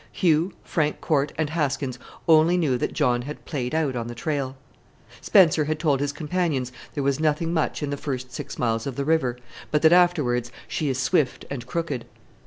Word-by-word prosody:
Hugh, 170 +1 +2
Frank 150 -2 -1
Corte, 145 -2 +1
and 155 -1 -1
Haskins 135 -5 -1 0.3
only 165 +2 +5
knew 150 -7 +2
that 125 - -1
John 125 -6 +2
had 145 +4 -8
played 135 -2 -3
out 150 -5 0
on 115 -1 -3
the 120 - -6
trail. 135 0 -2 0.6
Spencer 160 -5 +5
had 155 +1 -1
told 150 -4 +1
his 145 0 0
companions 150 -4 -1 0.2
there 145 - -1
was 140 0 +1
nothing 160 +2 +1
much 160 -2 0
in 145 - -2
the 145 - -2
first 130 -3 -5
six - - -6
miles 115 -1 0
of 135 - -4
the 140 - -2
river, 140 -6 +1 0.3
but 150 0 +1
that 160 +1 +7
afterwards 145 -10 +3 0.2
"she 150 - -1
is 130 - -1
swift 130 0 +1
and 125 -3 -5
crooked." 155 -6 -3
145 Hz, 195 wpm, -24 LUFS, 130-160 Hz, 0.6 s, that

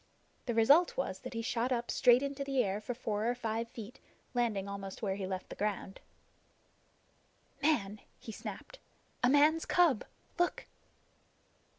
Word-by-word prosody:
The 235 - -1
result 285 +10 +5
was 190 -8 -2
that - - -8
he 230 - -2
shot 240 +2 -1
up 240 -1 -1
straight 245 +2 +5
into 280 0 -3
the 270 -2 +1
air 200 0 -2
for 245 +3 -4
four 215 -3 -2
or 245 - 0
five 230 -1 -2
feet, 230 +1 -9 0.3
landing 225 -5 0
almost 200 +1 -7
where 195 -2 0
he 195 -1 -4
left 185 -1 -5
ground. 205 -2 -2 1.6
"Man!" 215 -9 +1 0.2
he 225 - -9
snapped. - - -8 0.4
"A 245 - +4
man's 300 +4 +5
cub. 340 -10 +3 0.4
Look!" 350 - 0
235 Hz, 150 wpm, -33 LUFS, 205-270 Hz, 1.6 s, result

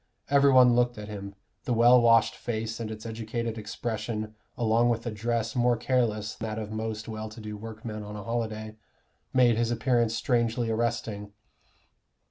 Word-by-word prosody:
Every 140 0 +6
one 125 -2 +7
looked 120 -1 +2
at 105 0 -7
him: 100 -1 -7 0.3
the 125 - 0
well 120 +2 +6
washed 115 -1 +4
face 115 -1 -4
and 115 -2 -4
its 110 0 -8
educated 115 0 -4
expression 110 0 -4 0.2
along 115 0 +3
with 115 0 -1
a 120 - -2
dress 115 +1 -2
more 120 -1 +3
careless 110 -4 0
than 110 - -5
that 110 - -4
of 110 -1 -6
most 110 0 -4
well 110 -1 -5
to 110 - -11
do 105 -1 -6
workmen 110 0 -7
on 105 0 -8
a 105 - -6
holiday, 110 -1 -3 0.5
made 120 -3 +4
his 115 0 +1
appearance 120 -1 +1
strangely 115 0 0
arresting. 110 -3 -2
115 Hz, 170 wpm, -28 LUFS, 110-120 Hz, 0.5 s, one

